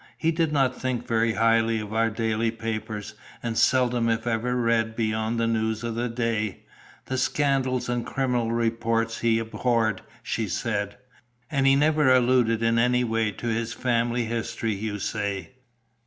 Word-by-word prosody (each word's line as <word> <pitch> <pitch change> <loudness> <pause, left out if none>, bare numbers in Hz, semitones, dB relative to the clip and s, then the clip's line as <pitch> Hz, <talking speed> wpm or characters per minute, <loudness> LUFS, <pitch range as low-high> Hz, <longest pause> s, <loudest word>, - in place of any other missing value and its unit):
"He 165 - +1
did 165 -1 0
not 135 -3 +1
think 130 -2 -2
very 115 0 +1
highly 115 0 +3
of 105 0 -6
our 115 0 +2
daily 115 0 0
papers, 110 -2 -5 0.3
and 115 -1 -2
seldom 125 -1 +3
if 115 0 0
ever 120 +1 0
read 115 -2 +1
beyond 110 0 -1
the 115 - +2
news 110 0 -1
of 115 -1 -2
the 120 +2 -2
day. 115 -4 -2 0.4
The 130 -1 -2
scandals 135 -4 +1
and 120 -1 -1
criminal 125 -4 -1
reports 115 0 0
he 115 -1 +2
abhorred," 115 -2 0 0.2
she 110 -2 -2
said. 100 +1 -2 0.5
"And 135 -2 +2
he 135 - +6
never 150 -1 +3
alluded 120 -3 +3
in 115 0 +3
any 125 +1 +3
way 115 -2 0
to - - -9
his 115 +1 -1
family 120 -1 0
history, 115 -1 -2
you 105 +1 -3
say? 100 +1 -3
115 Hz, 160 wpm, -25 LUFS, 110-125 Hz, 0.5 s, he